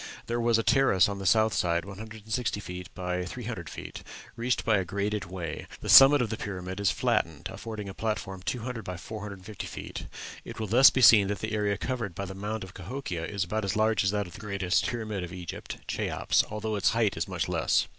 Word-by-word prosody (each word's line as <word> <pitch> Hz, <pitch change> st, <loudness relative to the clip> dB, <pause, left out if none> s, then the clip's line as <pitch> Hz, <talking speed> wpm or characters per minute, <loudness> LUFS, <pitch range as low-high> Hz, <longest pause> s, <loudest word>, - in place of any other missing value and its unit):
There 120 Hz, 0 st, -1 dB
was 115 Hz, -1 st, +3 dB
a 115 Hz, -, 0 dB
terrace 120 Hz, -11 st, +4 dB
on 100 Hz, -1 st, -4 dB
the 95 Hz, -, -2 dB
south 110 Hz, +2 st, +4 dB
side 85 Hz, 0 st, +1 dB
160 105 Hz, -2 st, -4 dB
by 90 Hz, -1 st, -2 dB
300 110 Hz, -3 st, -6 dB
feet, -, -, -8 dB, 0.3 s
reached 120 Hz, +1 st, -1 dB
by 110 Hz, -2 st, +4 dB
a -, -, 0 dB
graded 100 Hz, +2 st, -2 dB
way; 85 Hz, -3 st, -6 dB
the -, -, -5 dB
summit 135 Hz, 0 st, +9 dB
of 115 Hz, -, -3 dB
the 110 Hz, -, -2 dB
pyramid 95 Hz, -1 st, -5 dB
is 100 Hz, -2 st, +3 dB
flattened, -, -, 0 dB
affording 110 Hz, -3 st, -6 dB
a 95 Hz, -, -6 dB
platform 95 Hz, -3 st, -3 dB
200 120 Hz, 0 st, -3 dB
by 90 Hz, -1 st, -5 dB
450 105 Hz, 0 st, -7 dB
feet. -, -, -7 dB, 0.4 s
It -, -, -9 dB
will 110 Hz, -, -1 dB
thus 120 Hz, +6 st, +8 dB
be 130 Hz, -, 0 dB
seen 110 Hz, -5 st, +8 dB
that 100 Hz, +1 st, -1 dB
the 110 Hz, +3 st, -4 dB
area 105 Hz, -1 st, +1 dB
covered 115 Hz, -7 st, -3 dB
by 100 Hz, -, -3 dB
the 95 Hz, -, -7 dB
mound 105 Hz, +2 st, -4 dB
of 95 Hz, -1 st, -10 dB
Cahokia 95 Hz, -4 st, -5 dB
is 100 Hz, -2 st, -1 dB
about 105 Hz, +4 st, -2 dB
as 100 Hz, +2 st, -1 dB
large 110 Hz, -1 st, +2 dB
as 95 Hz, -, +2 dB
that 105 Hz, 0 st, 0 dB
of 90 Hz, -, -11 dB
the -, -, -10 dB
greatest 100 Hz, -4 st, 0 dB
pyramid 110 Hz, -5 st, -3 dB
of 85 Hz, -, -6 dB
Egypt, 90 Hz, -3 st, -6 dB
Cheops, -, -, +1 dB
although 105 Hz, 0 st, -3 dB
its 100 Hz, -, +2 dB
height 110 Hz, -4 st, +2 dB
is -, -, -2 dB
much -, -, -2 dB
less. -, -, +2 dB
105 Hz, 215 wpm, -28 LUFS, 95-110 Hz, 0.4 s, summit